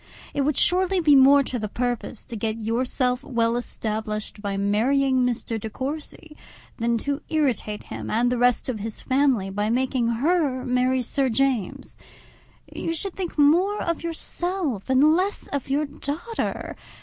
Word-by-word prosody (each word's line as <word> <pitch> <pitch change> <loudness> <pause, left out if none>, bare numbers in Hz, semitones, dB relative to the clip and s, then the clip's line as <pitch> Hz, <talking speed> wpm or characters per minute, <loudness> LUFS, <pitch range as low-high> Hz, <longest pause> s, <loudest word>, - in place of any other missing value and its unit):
It 285 - 0
would 280 0 +1
surely 370 +1 +3
be 300 -4 +5
much 265 - +8
more 280 +1 +6
to 255 -2 -4
the 215 -1 -3
purpose 245 -1 -3
to 235 - -6
get 220 +1 -2
yourself 250 +3 0
well 235 -4 0
established 215 -3 -4
by 200 -1 -2
marrying 260 +7 +2
Mr. 240 -3 -1
De 220 - -4
Courcy, 300 +5 -6 0.4
than 235 0 +1
to 280 +5 -2
irritate 255 -9 0
him - - -7
and 240 +2 +2
the 250 - 0
rest 245 -1 +3
of 245 -5 -3
his 215 +1 -5
family 260 -8 +1
by 205 +2 -1
making 255 0 +1
her 265 +2 +1
marry 255 0 +1
Sir 265 +2 +1
James. 250 -4 -1 0.8
You 330 - -2
should 390 +3 -2
think 365 -4 -5
more 350 +8 +4
of 335 -2 -2
yourself 335 - -3
and 280 +4 +5
less 380 +4 -1
of 280 -2 -4
your 290 +3 +1
daughter. 300 +9 -4
260 Hz, 160 wpm, -24 LUFS, 230-295 Hz, 0.8 s, much